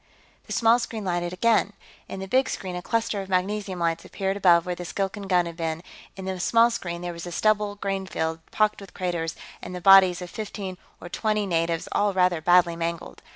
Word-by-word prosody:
The - - -10
small 230 +1 +4
screen 220 -3 -5
lighted 175 -1 -1
again. 210 +2 +2 0.4
In 190 - -6
the 190 - -5
big 260 +5 +2
screen, 185 -2 -4
a 180 - -4
cluster 225 0 -1
of 195 - -9
magnesium 190 +1 -1
lights 165 -1 -1
appeared 195 0 -3
above 175 -4 +4
where 180 - -2
the 175 - -7
Skilkan 195 +3 -4
gun 180 -2 +3
had 170 -1 -7
been; 165 0 -3 0.3
in 190 - -8
the 190 -1 -3
small 230 +5 +4
screen, 175 -7 -4
there 175 0 -4
was 170 +1 -8
a - - -6
stubbled 210 +1 +1
grain 195 -1 -2
field, 160 -2 -2
pocked 215 -1 +1
with 195 - -13
craters, 170 -3 -2 0.3
and 180 - -7
the - - -4
bodies 190 -1 +7
of 180 -1 -8
fifteen 195 -3 -6 0.2
or - - -9
twenty 215 +3 -1
natives, 165 -2 -1
all 205 -1 +1
rather 180 -3 +2
badly 175 0 +4
mangled. 170 0 -4
185 Hz, 210 wpm, -25 LUFS, 175-205 Hz, 0.4 s, bodies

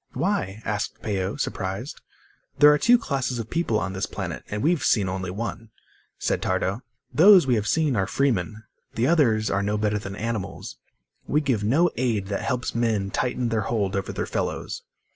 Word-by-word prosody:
"Why?" 110 - -1
asked 105 -1 -3
Peo, 95 -1 -2
surprised. 95 +9 -4 0.6
"There 150 0 +8
are 150 - +1
two 245 +8 +6
classes 135 - -2
of 115 -1 -6
people 165 -10 +1
on 95 -2 -3
this 95 - -2
planet, - - -5
and 105 0 -3
we've 165 0 +2
seen 100 -4 +3
only 95 0 -3
one," 115 +3 -5 0.5
said - - -1
Tardo. 100 +6 -1 0.3
"Those 185 0 +7
we 130 - +2
have 105 -2 0
seen 155 -2 +2
are 95 -3 +1
freemen. 110 -2 0 0.3
The 115 - +1
others 120 -9 +3
are 100 - +1
no 105 +1 0
better 105 0 0
than 100 -1 -7
animals. 115 -2 -4 0.5
We 150 - +2
give 130 -8 0
no 155 +11 +3
aid 110 -6 0
that 100 - -2
helps 125 +3 -2
men 110 -4 0
tighten 125 +1 -1
their 115 -1 0
hold 100 -5 0
over 100 - -2
their - - -3
fellows." - - -3
110 Hz, 180 wpm, -25 LUFS, 100-135 Hz, 0.6 s, There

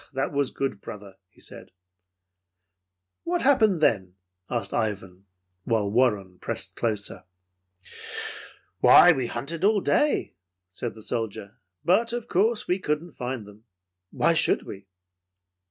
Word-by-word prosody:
"That 135 0 -1
was 140 -2 0
good, 135 -7 -3
brother," 100 -2 -10
he - - -25
said. - - -10 1.5
"What 350 0 -1
happened 220 - +4
then?" 95 -10 +2 0.3
asked 115 -5 -3
Ivan, 100 -4 -3 0.4
while 105 -2 0
Warren 105 -6 +1
pressed - - -4
closer. 105 -4 -2 1.5
"Why, - - +8
we 130 -2 0
hunted 155 +10 -5
all 210 +1 +4
day," 295 +9 +1 0.3
said 105 +6 -5
the 110 - -12
soldier, 110 -4 -4 0.3
"but 225 +7 +3
of 240 -1 -4
course 215 +4 +1
we 180 +2 +1
couldn't 155 0 -2
find 125 -3 -5
them. 105 +2 -16 0.4
Why - - +2
should - - +2
we?" 100 0 -10
120 Hz, 125 wpm, -26 LUFS, -, 1.5 s, Why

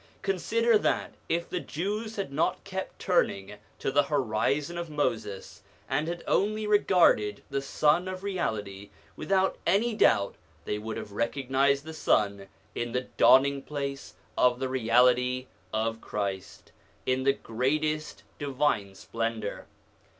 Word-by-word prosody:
Consider 220 +4 +2
that - - 0 0.2
if 170 +1 0
the 180 - -3
Jews 210 +8 -4
had 195 -9 -4
not 155 - 0
kept 190 -1 -5
turning 105 - 0 0.2
to - - -2
the 145 - +5
horizon 140 +3 0
of 170 -1 -5
Moses, 110 -9 -3 0.3
and 145 +4 0
had 170 0 -4
only 215 +2 +1
regarded 180 - +3
the 140 0 0
Sun 150 +5 +2
of 185 0 -5
Reality, 105 - -3 0.3
without 190 -1 +1
any 210 +7 +3
doubt 100 - +3 0.3
they 105 - -2
would 110 +1 -5
have - - -7
recognised 135 +5 +1
the 160 - -7
Sun 100 -9 +1 0.3
in 120 0 -3
the 125 - +1
dawning 135 +3 +5
place 140 -1 -5 0.2
of 125 -1 +3
the 130 0 -2
reality 125 +1 +3 0.3
of 115 +1 -1
Christ, 100 -3 -5 0.3
in 130 0 +1
the 135 +1 +3
greatest 150 +6 -2 0.2
divine 135 -9 0
splendour. 115 0 -4
140 Hz, 135 wpm, -28 LUFS, 115-170 Hz, 0.3 s, the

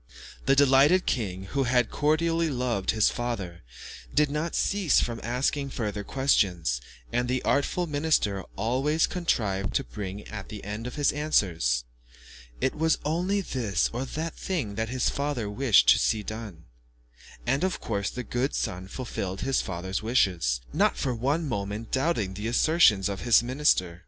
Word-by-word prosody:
The 135 - +5
delighted 145 +6 +5
king, 95 -7 -2
who 135 -1 +1
had 125 -1 +2
cordially 165 +2 +1
loved 125 -7 -2
his 110 -2 +3
father, 105 -8 -4 0.5
did 150 -1 +2
not 155 +3 -2
cease 195 -8 +2
from 115 -1 -2
asking 135 +4 -1
further 105 -5 -3
questions, 90 - +1 0.3
and 120 +1 +1
the 125 0 -1
artful 160 +5 +1
minister 145 - +1
always 130 +9 +1
contrived 105 - -1
to 135 - +2
bring 100 -4 -6
in - - -14
at 100 -3 -7
the 105 -2 -8
end 105 +4 -5
of 125 - -7
his 145 -1 +2
answers 85 - +1 0.8
"It 130 - 0
was 160 +1 +1
only 180 +6 0
this 110 - -1
or 125 +3 -2
that 160 +4 -4
thing 155 - -3
that 110 +2 -2
the 130 - -4
father 140 -6 -1
wished 105 - +4
to - - +7
see 110 -1 +1
done," 105 -7 -7 0.8
and 135 +6 +1
of 185 -1 0
course 100 -3 -2
the 125 - -5
good 125 +5 -2
son 90 +1 -3
fulfilled 95 -4 -5
his 135 0 +1
father's 95 +1 -4
wishes, 90 - +1
not - - +2
for 130 - -1
one 140 +8 -1
moment 105 -1 -4
doubting 130 - 0
the 105 +3 -4
assertions 120 - +4
of 100 -2 -4
his 120 -1 +5
minister. 120 - +1
120 Hz, 160 wpm, -27 LUFS, 100-145 Hz, 0.8 s, to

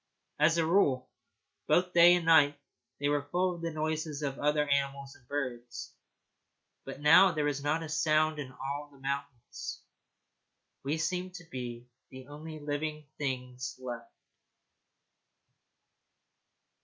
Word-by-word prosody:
As 160 +3 +4
a 165 - +2
rule, 140 -8 +2 0.6
both 180 0 +3
day 175 +1 +8
and 175 -2 -1
night, 145 -3 +5 0.4
they 145 - 0
were 145 0 0
full 180 +2 +1
of 170 - -9
the 170 - -2
noises 155 -1 -2
of 140 -1 -3
other 150 0 +2
animals 140 -1 -1
and 120 - -23
birds, 125 -4 -5 0.9
but 135 0 -7
now 185 +6 +7
there 150 -2 0
was 145 -1 -1
not 155 +3 0
a - - -5
sound 155 0 +2
in 135 -3 -5
all 140 +3 -5
the 140 - -18
mountains. 135 -2 -5 1.0
We 145 +4 -1
seemed 180 +3 -2
to 180 - -8
be 125 -5 -7 0.2
the 130 0 -11
only 155 +2 -8
living 150 +1 -3
things 125 -3 -3
left. 120 -2 -7
145 Hz, 135 wpm, -31 LUFS, 135-160 Hz, 1.0 s, day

